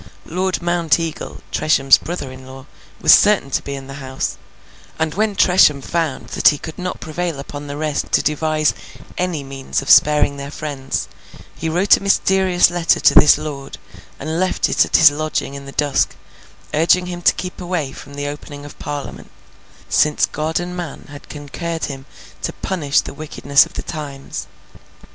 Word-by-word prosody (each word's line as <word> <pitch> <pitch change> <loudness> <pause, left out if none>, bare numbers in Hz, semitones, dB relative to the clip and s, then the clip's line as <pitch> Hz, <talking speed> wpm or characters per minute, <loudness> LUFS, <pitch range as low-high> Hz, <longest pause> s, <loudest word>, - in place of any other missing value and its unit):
Lord 185 +1 -2
Mounteagle, 165 -2 -1
Tresham's 135 -3 +4
brother 165 -6 -5
in 130 0 -12
law, 130 0 -11 0.4
was - - +7
certain 205 -9 +4
to - - 0
be 140 - -5
in 135 -1 -8
the 135 +1 -9
house; 130 0 -3 0.6
and 160 -1 -1
when 210 0 0
Tresham 180 -7 +5
found 160 -1 -3
that - - +2
he 145 - +5
could 160 +4 -9
not 180 0 -4
prevail 165 -1 -4
upon 145 +1 -8
the 145 0 -6
rest 155 -1 -2
to - - +3
devise 155 0 +1 0.4
any 180 -5 -2
means 135 0 -4
of - - +1
sparing 150 -1 +5
their 140 0 -6
friends, 140 -2 -4 0.5
he 165 - -4
wrote 180 +5 +4
a - - -10
mysterious 190 -2 +3
letter 175 -1 +2
to - - +5
this 150 - +7
lord 140 -3 -7 0.4
and 160 +4 -3
left 185 0 +1
it - - +4
at - - +3
his 165 -3 +8
lodging 155 -1 -3
in 140 0 -8
the - - -8
dusk, 145 -1 0 0.6
urging 170 +4 +3
him 175 -1 -6
to - - +4
keep 180 0 -6
away 175 -6 -2
from 140 +1 -11
the 145 0 -4
opening 145 0 -8
of 145 - -12
Parliament, 145 -1 -6 0.6
'since 150 -1 +3
God 155 +2 -2
and 180 0 -5
man 170 -6 -7
had 145 - -12
concurred 160 +3 -5
to 135 -2 -7
punish 150 -7 +1
the - - -8
wickedness 150 0 +2
of - - -19
the - - -4
times. 140 -4 -7
155 Hz, 175 wpm, -19 LUFS, 140-175 Hz, 0.6 s, his